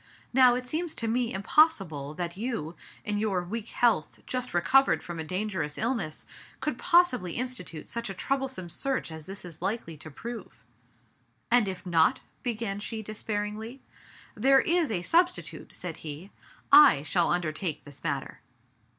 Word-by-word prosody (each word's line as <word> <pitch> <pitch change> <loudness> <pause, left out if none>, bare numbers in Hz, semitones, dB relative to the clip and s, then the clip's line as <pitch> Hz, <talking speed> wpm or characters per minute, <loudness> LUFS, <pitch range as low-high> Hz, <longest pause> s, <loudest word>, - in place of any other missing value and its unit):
Now, 250 -1 +6
it 250 0 -4
seems 325 +3 -2
to 230 - -1
me 235 +1 0
impossible 190 - +2
that 175 0 -4
you, 210 -7 -3 0.3
in 205 0 0
your 200 -4 0
weak 215 +5 -5
health, 225 -12 +1
just 255 0 -3
recovered 265 +10 +4
from 170 -1 -6
a - - -2
dangerous 185 -3 -2
illness, 225 -10 -2 0.3
could - - -3
possibly 255 - +3
institute 240 -10 -4
such 235 -2 -4
a 195 - -5
troublesome 265 -7 -2
search 270 -6 -1
as 160 -1 -8
this 195 0 -8
is 165 -3 -11
likely 190 -4 -3
to 155 - -9
prove." 205 - -8 0.9
"And 240 -3 +5
if 190 -1 -5
not?" 170 +8 +3 0.2
began 220 -4 -2
she 220 +1 -4
despairingly. 215 +3 -4 0.5
"There 270 0 +5
is 340 -2 +2
a 180 -5 -1
substitute," 350 - +1
said 175 -3 -5
he. 155 +5 -8 0.7
"/shall 170 +2 +1
un 175 0 +2
dertake 155 -1 -3
this 145 -2 -8
matter." 140 -4 -3
205 Hz, 150 wpm, -28 LUFS, 170-245 Hz, 0.9 s, Now